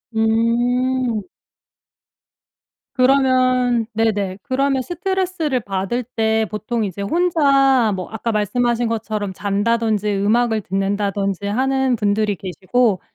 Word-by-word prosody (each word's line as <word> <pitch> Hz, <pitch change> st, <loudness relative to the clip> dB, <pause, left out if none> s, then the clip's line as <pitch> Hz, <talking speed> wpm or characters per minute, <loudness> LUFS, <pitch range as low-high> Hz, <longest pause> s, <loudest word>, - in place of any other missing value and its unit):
음. 235 Hz, +1 st, +1 dB, 1.7 s
그러면 255 Hz, -3 st, +3 dB
네네. 205 Hz, -4 st, 0 dB
그러면 265 Hz, 0 st, 0 dB
스트레스를 350 Hz, -4 st, -2 dB
받을 195 Hz, +5 st, -2 dB
때 220 Hz, -2 st, 0 dB
보통 220 Hz, +2 st, -2 dB
이제 195 Hz, +1 st, -6 dB
혼자 275 Hz, -, +3 dB
뭐 185 Hz, -, -5 dB
아까 225 Hz, +1 st, -3 dB
말씀하신 235 Hz, +3 st, 0 dB
것처럼 215 Hz, -3 st, -3 dB
잔다든지 210 Hz, +1 st, 0 dB
음악을 220 Hz, +2 st, +1 dB
듣는다든지 195 Hz, 0 st, -2 dB
하는 265 Hz, +3 st, +1 dB
분들이 205 Hz, -1 st, 0 dB
계시고 195 Hz, +4 st, 0 dB
225 Hz, 240 characters per minute, -20 LUFS, 205-255 Hz, 1.7 s, 그러면